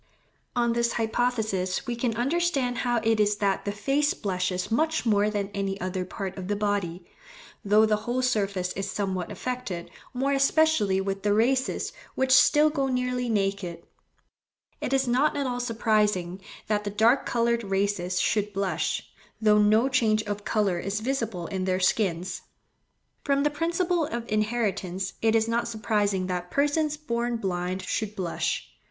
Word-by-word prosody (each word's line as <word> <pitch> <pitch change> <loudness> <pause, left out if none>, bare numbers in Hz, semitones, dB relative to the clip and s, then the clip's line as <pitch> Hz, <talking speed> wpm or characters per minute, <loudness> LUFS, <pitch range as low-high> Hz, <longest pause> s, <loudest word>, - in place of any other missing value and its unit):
On 235 -1 +2
this 235 0 +1
hypothesis 220 -5 -1
we 240 -2 -2
can 235 -1 -1
understand 270 -1 0
how 240 -2 +1
it 225 -1 +2
is 210 0 +3
that 200 -2 0
the 205 - -1
face 275 +9 +1
blushes 185 -1 -2
much 315 +6 +1
more 210 -2 +3
than 205 -2 -2
any 195 0 -2
other 185 0 -3
part 190 0 -5
of 180 - -6
the 205 - 0
body, 200 -4 -2 0.6
though 210 +2 +5
the 215 -1 +2
whole 240 +4 -2
surface 200 -7 0
is 195 +1 -4
somewhat 190 -3 -2
affected, 250 -9 -5 0.2
more 265 +2 0
especially 275 -7 +3
with 195 0 -2
the 205 0 +2
races 260 +4 +1 0.2
which 265 0 +1
still 300 +3 +6
go 275 -3 0
nearly 250 -1 -1
naked. 195 -5 -1 1.0
It - - -2
is 270 -1 +2
not 270 +5 +2
at 280 - 0
all 245 -1 -2
surprising 210 -6 0 0.2
that 210 -1 0
the 205 - -2
dark 225 +6 +3
coloured 235 0 +1
races 195 -2 0
should 210 +2 0
blush, 195 -1 -1 0.4
though 210 -1 +4
no 215 +4 +4
change 225 -5 +2
of 205 -1 -4
colour 200 -5 +1
is 195 +4 -2
visible 225 -7 -2
in 185 +1 -3
their 185 0 +1
skins. 185 -2 0 0.8
From 280 -1 +2
the 295 - +2
principle 340 +1 0
of 235 0 -4
inheritance 205 -4 -1
it 225 0 +3
is 225 0 +3
not 235 +1 0
surprising 210 -4 0
that 180 -1 -3
persons 295 - +1
born 240 -5 -2
blind 185 -2 -2
should 215 +2 -3
blush. 180 -5 -2
215 Hz, 160 wpm, -26 LUFS, 195-245 Hz, 1.0 s, still